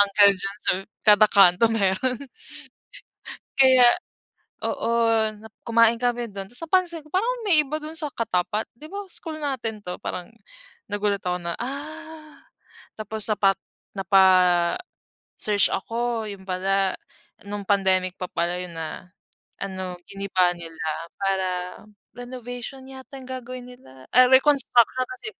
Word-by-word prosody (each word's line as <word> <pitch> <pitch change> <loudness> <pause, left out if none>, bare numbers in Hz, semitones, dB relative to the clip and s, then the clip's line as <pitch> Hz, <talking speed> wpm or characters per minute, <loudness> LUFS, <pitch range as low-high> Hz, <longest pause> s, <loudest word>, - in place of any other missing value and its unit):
Uncle 200 0 +6
John's 195 +3 -6 0.4
kada 210 0 +7
kanto 195 +2 +6
meron. 225 +4 0 1.4
Kaya 260 -2 +7 0.8
oo - - -2 0.5
na 220 +1 -12 0.2
kumain 230 0 +4
kami 240 -1 0
dun 195 -1 -6
tapos 245 +7 -10
napansin 350 -1 +1
ko 305 - -17
parang 425 +6 +1 0.2
may 315 -5 +6
iba 300 +2 -4
dun 310 +1 -8
sa 300 -4 -2
katapat 210 0 -1
di 300 +6 -12
ba 405 0 -5
school 315 -1 -3
natin 235 -6 -3
'to 180 -1 -5
parang, 180 - -4 0.6
nagulat 205 -1 -1
ako 180 0 -1
na 170 0 -3
ah, 310 +3 -8 0.6
tapos 215 0 0
sapat 200 -2 +3 0.4
napa 195 0 +4 1.2
search 205 -2 +3
ako, 230 +2 -2
yun 195 -1 -9
pala, 190 +1 +1 0.5
nung 205 0 -5
pandemic 185 -2 +2
pa 180 - -3
pala 170 +1 -1
yun 180 -1 -6
na, 165 +3 -7 0.5
ano 185 -2 -5
giniba 190 -2 +1
nila 165 -1 -11 0.4
para, 195 -1 0 0.7
renovation 245 +1 -8
yata 265 +1 -11
yung 260 - -12
gagawin 255 -1 -7
nila, 130 - -16
ay 255 +1 +8
reconstruction 260 -2 +4
kasi 385 +2 -9
220 Hz, 130 wpm, -24 LUFS, 195-260 Hz, 1.4 s, ay